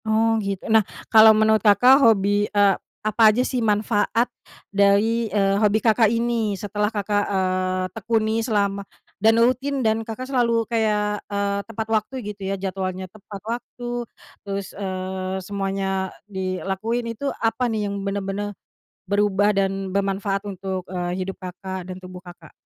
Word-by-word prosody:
Oh 225 +1 +2
gitu. 195 -2 -4
Nah, 220 - +7 0.3
kalau 220 0 +9
menurut 220 0 +4
Kakak 245 +6 +6
hobi, 205 -3 +3
eee, 200 -1 +4 0.3
apa 215 +1 -1
aja 245 - +1
sih 250 -2 -1
manfaat 220 +2 +1 0.4
dari, 205 +3 +3
eee, 200 0 +1
hobi 210 0 +4
Kakak 220 0 +3
ini 230 -3 0
setelah 210 +2 -1
Kakak, 205 -1 -1
eee, 185 -1 0
tekuni 225 0 0
selama 200 -3 0 0.4
dan 225 +2 +5
rutin 255 +2 +1
dan 220 0 +2
Kakak 225 +3 -6
selalu 235 -4 +1
kayak, 210 -2 0
eee, 200 0 -1
tepat 220 0 -4
waktu 215 +3 0 0.2
gitu 200 - -23
ya. 195 - -1
Jadwalnya 185 -1 -3
tepat 200 -1 -10
waktu 240 +1 -5 0.3
terus, 200 -1 -5
eee, 185 -1 -4
semuanya 195 -1 -2 0.2
dilakuin 195 +4 -3
itu, 275 +5 -3
apa 230 +2 0
nih 215 -2 -1
yang 200 0 -4
bener-bener 200 +1 -3 0.5
berubah 205 +1 +2
dan 195 -1 -1
bermanfaat 195 +1 -1
untuk, 190 -1 -5
eee, 180 -1 -3
hidup 190 +1 -4
Kakak 185 0 -6
dan 185 - -9
tubuh, 185 0 -11
Kakak? 175 -3 -13
205 Hz, 145 wpm, -23 LUFS, 195-225 Hz, 0.5 s, kalau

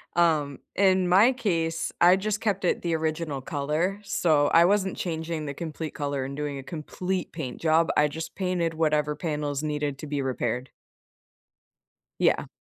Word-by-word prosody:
Um, 155 -5 +2 0.2
in 190 -2 +3
my 205 +8 +6
case, 165 -9 -1
I 180 +2 +6
just 210 +1 -1
kept 200 -4 -1
it - - +1
the 170 -2 0
original 155 -3 -2
color. 155 +8 -1
So 155 -7 +2
I 165 +1 +6
wasn't 195 0 +2
changing 160 -2 -3
the 140 - -5
complete 160 0 -5
color 140 -2 -2
and 135 +1 -6
doing 145 -2 -3
a 135 - -8
complete 175 +5 -4
paint 135 -7 -5
job. 165 0 +3
I 150 - +5
just 160 +2 -6
painted 180 -3 -1
whatever 150 -2 +1
panels 150 -2 -3
needed 150 -2 -2
to 155 - -8
be 145 -1 -2
repaired. 125 -1 -2 1.5
Yeah. - - +2
160 Hz, 160 wpm, -26 LUFS, 145-180 Hz, 1.5 s, my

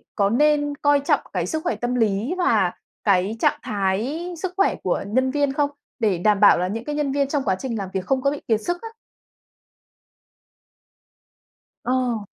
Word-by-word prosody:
có 200 -2 +2
nên 290 +4 +2
coi 290 0 +3
trọng 280 - +2
cái - - -1
sức 315 0 -3
khỏe 350 - 0
tâm 245 +1 -2
lý 220 - +1
và 360 - +2 0.3
cái 200 +1 +2
trạng - - +2
thái 220 - -1
sức 360 +2 -4
khỏe 390 - +3
của 180 - 0
nhân 260 +5 +1
viên 285 -1 +1
không? 285 0 +1 0.3
Để 210 -6 +1
đảm 205 +3 +2
bảo 205 - +7
là 180 +1 0
những 225 +4 -4
cái 295 - -3
nhân 295 -2 0
viên 280 0 +1
trong 280 0 -1
quá 190 -5 +1
trình 235 -1 -3
làm 195 -2 -4
việc 190 -1 -2
không 265 -1 +1
có 280 +1 +2
bị 290 - -5
kiệt 220 -2 +2
sức 350 +8 -3
á. 455 - -7 2.9
Ờ. 245 -4 0
255 Hz, 190 wpm, -22 LUFS, 210-290 Hz, 2.9 s, bảo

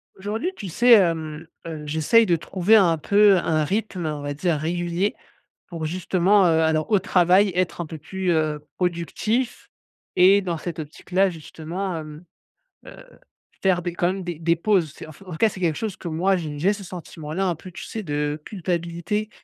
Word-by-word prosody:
Aujourd'hui, 215 - -3
tu 200 - -7
sais, 240 +8 +5
hem, 165 -6 +2 0.2
heu, 155 -2 -6
j'essaie 160 +10 +3
de 175 -4 +3
trouver 185 +5 +2
un 175 -6 +5
peu 200 +5 +5
un 160 -3 +1
rythme, 190 0 -2
on 150 -1 -3
va 145 0 -3
dire 165 +3 0
régulier 175 +5 -1 0.5
pour 165 -3 -5
justement, 185 +4 +2
heu, 160 -1 +3
alors 160 +2 +1
au 210 - +6
travail, 185 +1 +3
être 180 -1 -1
un - - -3
peu 160 0 -8
plus, 185 +4 -2
heu, 155 -2 0 0.2
productif 185 - -2 0.5
et 190 +2 +6
dans 175 -3 -3
cette 165 +2 -6
optique-là 180 +5 0
justement, 170 +3 -5
hem, 155 +1 -9 0.6
heu, - - -10 0.7
faire 185 -2 +2
des 175 0 -4
quand 175 0 0
même 190 +1 -2
des 175 -3 -5
des 170 0 +2
pauses. 170 -4 +1
C'est - - -10
en - - -10
f 170 - -16
en 185 - -11
tout 160 - -5
cas, 225 - +4
c'est 190 - -10
quelque 165 -4 +1
chose 215 -5 -4
que - - -8
moi 180 +4 +1
j'ai 155 -4 -5
j'ai 185 +6 +3
ce 205 -1 -8
sentiment-là, 170 0 -5
un 175 - 0
peu, 185 +4 -11
tu 190 +3 -9
sais, 220 - -6
de 150 -2 -2
culpabilité 175 +2 -3
175 Hz, 195 wpm, -23 LUFS, 160-195 Hz, 0.7 s, au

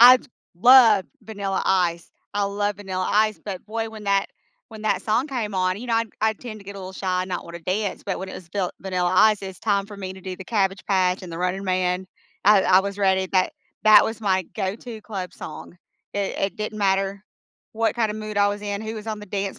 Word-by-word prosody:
I 250 +2 +11
j - - -18 0.3
love 225 -2 +7 0.2
Vanilla 200 -3 -3
Ice, 175 -3 +1 0.2
I 205 0 +1
love 205 0 -1
Vanilla 190 -2 -3
Ice, 215 0 +3
but 190 -4 -5
boy, 225 +1 -3
when 215 -2 -10
that 200 0 +2 0.4
when 220 -2 -10
that 200 -3 +1
song 230 +6 +1
came 225 -7 -3
on, 185 +1 +1
you 245 - -7
know, 235 - +1
I 230 0 +2 0.2
I 220 0 +3
tend 215 0 -9
to - - -15
get 200 +1 -8
a - - -7
little 190 0 -7
shy 185 -1 -1
and 185 - -7
not 180 - -3
want 170 0 -8
to 170 - -12
dance, 195 +4 -2
but 195 - -2
when 190 0 -6
it - - -7
was 175 - -10
Vil 185 0 -1
Vanilla 180 -2 0
Ice, 210 +1 +5
it's 190 -3 -7
time 200 -2 +1
for 205 0 -10
me 190 -1 -5
to 190 - -12
do 185 0 -6
the 190 - -9
Cabbage 195 -2 0
Patch 185 -1 +2
and 180 - -8
the 165 - -5
Running 180 +2 -1
Man. 185 0 0 0.4
I 200 -1 +7
I 185 0 +6
was 200 +1 -5
ready, 190 -1 +2
that 185 -1 +2 0.3
that 215 0 +8
was 225 0 -4
my 190 -3 +2
go-to 215 +3 -4
club 190 -5 -5
song. 165 +2 -9 0.4
It 200 -1 -2
it 195 -2 -1
didn't 215 0 -4
matter 195 0 +1 0.5
what 225 0 0
kind 230 -2 +2
of 210 - -4
mood 215 -1 -6
I 205 - +5
was 205 0 -4
in, 205 -1 -3
who 220 0 -4
was 215 0 -8
on 215 -1 -3
the 210 - -9
dance 195 0 -3
200 Hz, 245 wpm, -24 LUFS, 185-215 Hz, 0.5 s, I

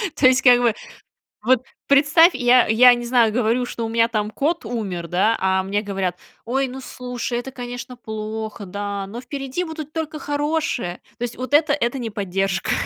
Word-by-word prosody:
То 255 - +5
есть, 260 +1 +4
как 245 -2 +6
бы, 235 -3 +3 0.7
вот 255 +1 +3 0.2
представь, 300 +5 +5
я 245 0 +4
я 245 +3 +7
не 240 0 -3
знаю, 235 -3 +3
говорю, 240 +2 +1
что 230 -1 -4
у - - -4
меня 230 0 +3
там 215 -2 -2
кот 300 +5 -1
умер, 195 -7 -4
да, 195 +7 +2
а 190 0 +1
мне 205 +2 -1
говорят: 190 -4 -3 0.3
"Ой, 265 +3 0
ну 260 +1 -8
слушай, 250 -1 -5
это, 265 +2 -7
конечно, 245 0 -7
плохо, 220 -1 -6
да, 200 +1 -4
но 235 +5 -7
впереди 275 +5 -4
будут 315 -2 -7
только 320 -1 -4
хорошее." 290 - -2 0.2
То 245 - -5
есть 235 - -4
вот 255 +3 -6
это- 295 -1 +4
это 270 -2 -1
не 230 -2 -3
поддержка. 195 -1 -2
240 Hz, 185 wpm, -21 LUFS, 215-265 Hz, 0.7 s, я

